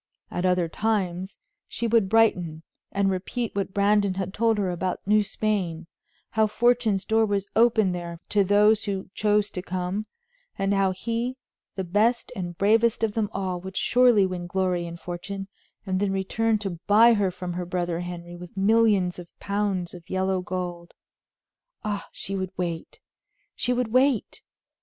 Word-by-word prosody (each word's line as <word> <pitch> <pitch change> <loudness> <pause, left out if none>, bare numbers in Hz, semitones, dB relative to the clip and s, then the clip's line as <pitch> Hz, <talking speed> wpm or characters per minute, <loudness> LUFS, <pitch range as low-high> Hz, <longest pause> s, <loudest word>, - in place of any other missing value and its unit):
At 175 - -2
other 180 -2 +2
times 190 -1 -2 0.3
she 235 - -4
would 225 -4 +3
brighten, 180 -8 +2 0.3
and 195 -1 +1
repeat 215 +5 -3
what 200 -1 -1
Brandon 200 -1 +2
had 190 0 -3
told 225 0 +2
her 195 -3 0
about 180 +1 -2
New 210 +2 +4
Spain; 195 -5 -2 0.5
how 220 -1 +3
fortune's 230 -3 +2
door 225 0 +3
was 200 -2 0
open 225 -4 +4
there 170 -1 -5
to 205 -1 +3
those 210 +3 +4
who 195 -2 -4
chose 210 -1 +1
to 180 - -4
come, 185 +3 -3 0.5
and 195 0 +1
how 195 -1 +3
he, 230 +6 -3 0.4
the 190 - -2
best 215 +7 +1
and 175 -3 -5
bravest 225 +4 +3
of 220 - +2
them 215 -2 0
all, 185 -3 -3
would 190 +1 -7
surely 245 -5 +4
win 180 -2 -4
glory 180 -1 0
and 170 0 -8
fortune, 195 +3 -6 0.4
and 185 -1 -1
then 200 -1 +1
return 215 +4 +1
to 195 -5 -5
buy 225 +3 +7
her 205 -3 +2
from 180 0 -5
her 180 +1 -3
brother 175 -1 -2
Henry 175 -1 -7
with 180 +2 -11
millions 200 -3 +3
of 175 -1 -13
pounds 200 -3 -1
of 175 -2 -12
yellow 190 0 0
gold. 175 -1 -5 0.9
Ah, 205 -2 -3
she 195 - -5
would 190 -1 -2
wait! 170 -2 -4 0.5
She 245 - -1
would 250 -2 0
wait! 255 0 +2
195 Hz, 165 wpm, -25 LUFS, 180-215 Hz, 0.9 s, buy